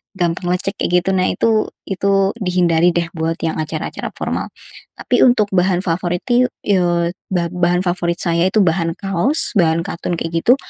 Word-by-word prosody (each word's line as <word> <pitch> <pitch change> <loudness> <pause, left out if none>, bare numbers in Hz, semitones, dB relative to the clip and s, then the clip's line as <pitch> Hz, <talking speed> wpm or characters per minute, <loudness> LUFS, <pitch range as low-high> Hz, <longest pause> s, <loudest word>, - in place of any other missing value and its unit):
gampang 175 -1 -1
lecek, 195 +3 -2
kayak 180 0 +1
gitu. 190 - -2
Nah, 185 0 +2
itu 220 -1 +1 0.2
itu 195 0 +1
dihindari, 175 -3 +2
deh, 170 -1 0
buat 165 -1 -2
yang 160 -1 -1
acara-acara 155 0 -5
formal. - - -3 0.5
Tapi, - - 0
untuk 230 -5 +3
bahan 180 -1 +2
favorit 175 0 -1
itu, 250 +1 +4 0.2
eee, 175 -3 +1 0.2
ba 175 -2 0
bahan 180 0 +1
favorit 175 -1 0
saya 170 0 +1
itu 215 - +3
bahan 165 -1 0
kaos, 195 - 0
bahan 165 -1 +2
katun, 175 -2 -3
kayak 165 0 -2
gitu, 250 - +6
180 Hz, 170 wpm, -18 LUFS, 170-195 Hz, 0.5 s, gitu